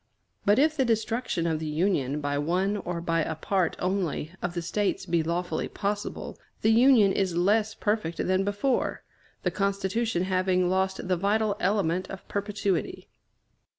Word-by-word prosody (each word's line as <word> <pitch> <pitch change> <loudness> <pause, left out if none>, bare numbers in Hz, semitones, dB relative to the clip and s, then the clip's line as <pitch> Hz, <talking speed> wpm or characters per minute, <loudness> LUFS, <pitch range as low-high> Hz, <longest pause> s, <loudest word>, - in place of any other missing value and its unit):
But 205 +2 +5
if 310 +3 +3
the 275 - +2
destruction 225 -5 0
of 160 -2 0
the 160 - -4
Union 150 -3 0
by 145 0 -1
one 185 +7 0
or 175 -3 -4
by 165 -1 +1
a 160 +1 -2
part 180 +2 0
only 180 -4 -1
of 180 0 -3
the 175 - -1
States 205 +4 -1
be 170 -2 +1
lawfully 170 +2 -2
possible, 205 +1 -4 0.2
the 220 - +5
Union 230 -3 +6
is 190 -3 0
less 215 +4 +2
perfect 205 -6 -1
than 185 +1 +1
before, 205 +6 -1 0.4
the - - +1
Constitution 200 0 0
having 185 -1 +1
lost 190 0 0
the 185 -1 +1
vital 205 +3 +1
element 185 -2 0
of 195 - -9
perpetuity. 200 -2 -2
190 Hz, 155 wpm, -27 LUFS, 170-210 Hz, 0.4 s, Union